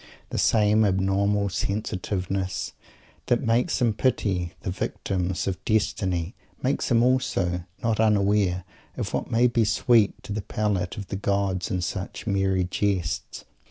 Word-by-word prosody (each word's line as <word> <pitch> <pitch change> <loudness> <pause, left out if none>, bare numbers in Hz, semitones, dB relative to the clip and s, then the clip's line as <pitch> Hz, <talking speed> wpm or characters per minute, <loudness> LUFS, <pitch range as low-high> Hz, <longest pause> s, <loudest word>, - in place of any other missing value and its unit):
The - - -1
same 110 0 +4
abnormal 100 +1 +2
sensitiveness 95 -1 -2 0.5
that 120 +2 +2
makes 115 +1 +2
him 120 -3 +2
pity 95 -8 0
the 90 - -3
victims 90 0 -2
of 95 -3 -3
destiny 95 -4 0 0.3
makes 135 +2 0
him 115 -2 +4
also 95 -9 +1 0.2
not 115 -2 +1
unaware 100 -4 +2 0.3
of - - -3
what - - -2
may 115 +2 +3
be 120 -1 +3
sweet 110 0 +3
to 105 - -5
the 110 - -2
palate 100 -2 -1
of 100 -3 -6
the - - -3
gods 100 -2 0
in 90 - -1
such 95 +2 -4
"merry 95 -3 +1
jests." 95 -1 -2
100 Hz, 140 wpm, -25 LUFS, 95-110 Hz, 0.5 s, same